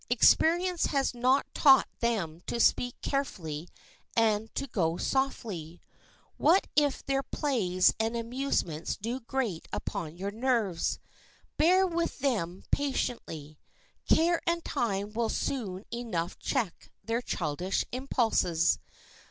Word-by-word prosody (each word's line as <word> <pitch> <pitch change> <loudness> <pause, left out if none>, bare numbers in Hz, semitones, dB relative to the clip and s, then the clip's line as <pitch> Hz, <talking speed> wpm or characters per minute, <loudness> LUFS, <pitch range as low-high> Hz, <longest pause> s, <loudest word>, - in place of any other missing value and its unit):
Experience 340 +8 +4
has 275 -3 0
not 255 +3 +2
taught 270 -3 +6
them 190 -9 -1
to 235 - -2
speak 245 +1 +2
carefully 175 - -3 0.5
and 220 -1 +2
to - - -1
go 170 -9 0
softly. 205 - -2 0.6
What 340 +6 +4
if 290 -2 +2
their 275 0 +1
plays 210 - +1
and 225 +1 0
amusements 230 - -2
do 230 +5 -3
grate 235 -8 -3
upon 160 0 -4
your 195 +2 -3
nerves. 220 -6 0 0.6
Bear 365 +4 +5
with 340 -2 -1
them 205 -10 -1
patiently. 165 - -2 0.5
Care 335 +1 +4
and 340 0 0
time 210 -6 -1
will 230 0 0
soon 200 -7 -3
enough 195 -8 -3
check 200 -8 -2 0.2
their 230 +2 0
childish 175 -2 -2
impulses. 225 -10 +1
230 Hz, 115 wpm, -29 LUFS, 180-275 Hz, 0.6 s, taught